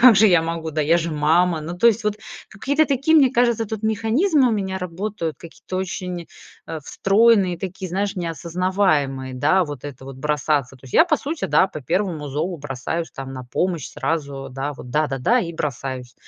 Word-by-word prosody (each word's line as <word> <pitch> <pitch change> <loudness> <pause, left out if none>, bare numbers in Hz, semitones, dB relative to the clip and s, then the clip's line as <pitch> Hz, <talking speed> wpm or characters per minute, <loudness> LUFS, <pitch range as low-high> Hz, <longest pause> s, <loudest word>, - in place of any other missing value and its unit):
как 245 -3 +8
же 215 +2 +7
я 175 -3 +5
могу, 165 -1 -3
да, 155 0 -1
я 160 +3 +4
же 170 0 -1
мама. 160 +3 +2
Ну 170 +3 -6
то 235 - +6
есть 225 0 0
вот 210 -1 +1 0.3
какие-то 285 +9 +1
такие, 280 +4 +3
мне 270 -5 +6
кажется, 235 -2 +2
тут 220 0 -5
механизмы 240 - +2
у - - +1
меня 190 -2 -2
работают, 180 -2 -4
какие-то 170 +2 -8
очень, 180 -2 -4 0.4
э, 160 - -5
встроенные, 195 0 +3
такие, 185 0 -5
знаешь, 195 +3 -2
не 175 -2 -2
осознаваемые. 160 -6 0
Да, 155 +8 +3
вот 145 -3 -8
это 135 -2 -8
вот, 135 - -8
бросаться. 145 -2 0
То 130 - -21
есть 130 - -11
я, - - +8
да, - - -2
по 310 - +3
сути 305 +4 -3 0.4
по 155 - -5
первому 170 - -1
зову 160 +6 -2
бросаюсь, 145 +4 -4
там, 135 -1 -7
на 130 -1 -6
помощь, 165 +4 -2
сразу, 140 -4 -3
да 135 +2 -3
вот, 125 -3 -10
да-да-да, 150 - +2
и 170 -2 -4
бросаюсь. 130 -4 -4
170 Hz, 195 wpm, -22 LUFS, 145-205 Hz, 0.4 s, как